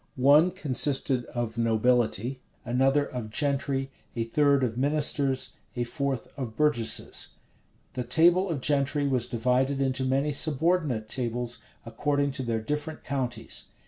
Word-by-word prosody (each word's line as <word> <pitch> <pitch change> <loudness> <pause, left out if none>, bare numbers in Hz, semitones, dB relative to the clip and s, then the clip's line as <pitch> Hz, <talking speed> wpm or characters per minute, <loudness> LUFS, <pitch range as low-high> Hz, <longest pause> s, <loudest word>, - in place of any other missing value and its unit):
One 145 +6 +5
consisted 140 -5 +1
of 120 -2 -4
nobility, 115 +1 +1 0.3
another 135 +4 +2
of 120 -5 -6
gentry, 135 +1 -1 0.2
a 115 - -1
third 140 +3 +2
of 115 -3 -1
ministers, 140 0 +1 0.2
a 120 - -1
fourth 135 -1 -3
of 115 -5 -5
burgesses. 145 -6 +1 0.6
The 125 - -3
table 170 +9 +4
of 150 -6 -2
gentry 145 +1 +1
was 125 -3 +1
divided 125 +3 0
into 130 -1 0
many 135 +3 +1
subordinate 150 -5 +1
tables, 120 0 -2 0.3
according 140 +4 -1
to 135 0 -3
their 115 -3 -2
different 150 +6 -4
counties. 125 -4 -3
135 Hz, 130 wpm, -27 LUFS, 120-145 Hz, 0.6 s, One